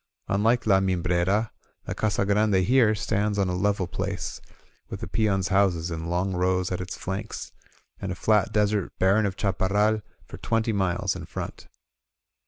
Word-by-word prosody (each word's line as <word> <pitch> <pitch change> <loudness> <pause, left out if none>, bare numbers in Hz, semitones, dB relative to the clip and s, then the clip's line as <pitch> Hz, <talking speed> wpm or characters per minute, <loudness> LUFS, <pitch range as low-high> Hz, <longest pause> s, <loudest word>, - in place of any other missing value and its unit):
Unlike 115 +5 +2
La 95 -3 +5
Mimbrera, 95 +3 +1 0.3
the - - -3
Casa 105 -2 0
Grande 105 0 +2
here 120 -2 +4
stands 105 0 -1
on 95 -2 +1
a 90 - -1
level 100 0 +1
place, - - -4 0.5
with - - -6
the - - -4
peons' 100 -4 0
houses 95 -4 +2
In 80 0 -4
long 90 +3 0
rows 90 0 0
at 90 - -2
its 90 - -6
flanks, 95 +1 -5 0.5
and 95 - -4
a - - -3
fla.t 105 +4 +2
desert 105 -2 0
barren 100 +3 +3
of 95 - -4
chaparral 105 +2 +1 0.2
for - - -10
twenty 115 0 0
miles 95 -3 0
in - - -7
front. - - -7
100 Hz, 165 wpm, -26 LUFS, 90-105 Hz, 0.5 s, La